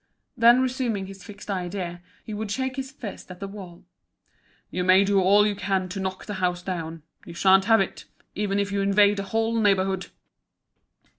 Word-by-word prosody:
Then 240 +2 +6
resuming 245 -6 -1
his 195 0 -11
fixed 205 -1 -9
idea, 180 -2 -4 0.2
he 215 - -7
would 210 0 -4
shake 260 +4 -2
his 265 0 -4
fist 260 -9 -9
at 180 -1 -10
the 195 - -5
wall. 190 -4 -11 0.9
"You 180 - -2
may 185 +2 +6
do 200 -1 +2
all 200 +3 +5
you 210 - +1
can 190 -1 -1
to 195 +2 -5
knock 190 0 -4
the 205 - -5
house 180 -1 0
down. 165 -4 -5 0.2
You 170 - -10
sha'n't 190 +2 +5
have 225 +1 +5
it, 190 - -4 0.3
even 200 0 -1
if 200 0 -1
you 200 0 0
invade 200 +1 +4
the 200 - -2
whole 225 +3 0
neighbourhood." 195 -2 +1
195 Hz, 190 wpm, -25 LUFS, 185-210 Hz, 0.9 s, Then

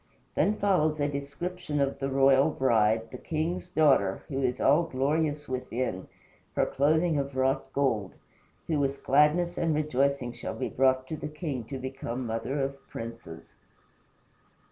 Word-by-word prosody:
Then 210 - +2
follows 155 -6 +2
a 145 - +2
description 150 +3 -4
of 140 0 0
the 135 - -1
royal 135 +2 +4
bride, 115 -5 +2
the 125 - -8
king's 165 +3 -2
daughter, 140 - +3
who 135 -2 -2
is 125 -1 0
all 145 +5 +5
glorious 150 0 -1
within 125 -6 -3 0.5
her - - +3
clothing 155 +3 +2
of 140 -1 -4
wrought 135 +1 0
gold 115 -9 0 0.5
who 155 -3 0
with 140 0 -1
gladness 150 +5 +3
and 165 -2 +1
rejoicing 140 -4 0
shall - - -6
be - - -3
brought 130 0 +2
to 155 - -3
the 150 - -5
king 150 -6 -4
to 135 +3 -6
become 130 -1 -5
mother 115 +5 -2
of 135 0 -4
princes. 115 -8 -8
140 Hz, 150 wpm, -28 LUFS, 130-150 Hz, 0.5 s, all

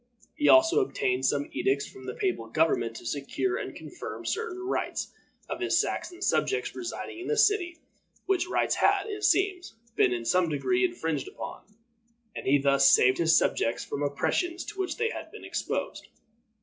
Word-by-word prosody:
He 295 - +2
also 330 +5 +6
obtained 130 - 0
some 145 +1 0
edicts 140 +1 0
from 130 0 -12
the 125 - -5
papal 180 -13 -1
government 115 -3 +1
to - - -9
secure 145 - -2
and - - -6
confirm - - -8
certain 450 -5 -2
rights 375 - -3 0.3
of - - -4
his - - +2
Saxon 360 +2 -3
subjects 415 +2 0
residing 350 -1 -6
in 365 - -6
the 450 - 0
city, 380 -6 +2 0.5
which 370 -2 +1
rights - - +1
had, - - +2
it 415 -1 -6
seems, 375 - +1 0.2
been 130 - +4
in 120 -1 -2
some 180 +4 +2
degree 365 - +1
infringed 165 - -1
upon, 210 - -9 0.6
and - - -6
he 140 +2 +5
thus 140 0 +4
saved 130 +1 +5
his 165 -1 +5
subjects 115 -4 0
from 140 - -4
oppressions 335 - -1
to 400 - -9
which 380 - -2
they 455 0 0
had - - -7
been - - -10
exposed. - - -3
295 Hz, 175 wpm, -28 LUFS, -, 0.6 s, also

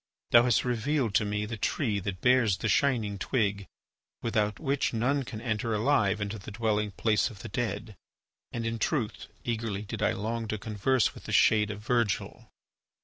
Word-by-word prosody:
Thou 120 - +8
hast 125 -1 +2
revealed 125 0 0
to 105 - +3
me 105 +1 -1
the 115 +1 -5
tree 105 -1 0
that 95 -1 -5
bears 125 -6 +4
the - - -2
shining 110 -4 +1
twig 100 -4 0 0.6
without 105 -2 0
which 140 -5 0
none 135 +5 +1
can 115 -4 -6
enter 110 -1 -1
alive 105 -3 +2
into 100 +1 -3
the 95 - -9
dwelling 105 -1 0
place 105 +3 +1
of 100 -5 -12
the - - -6
dead. 105 -1 -3 0.6
And 115 -1 -3
in 115 0 -2
truth, 115 -2 -1 0.2
eagerly 110 -4 -2
did 100 - -6
I - - +2
long 115 +3 -3
to 110 - -2
converse 110 +4 +1
with - - -13
the - - -5
shade 105 -1 +4
of 105 0 -6
Virgil." 115 -4 -1
110 Hz, 180 wpm, -29 LUFS, 105-120 Hz, 0.6 s, Thou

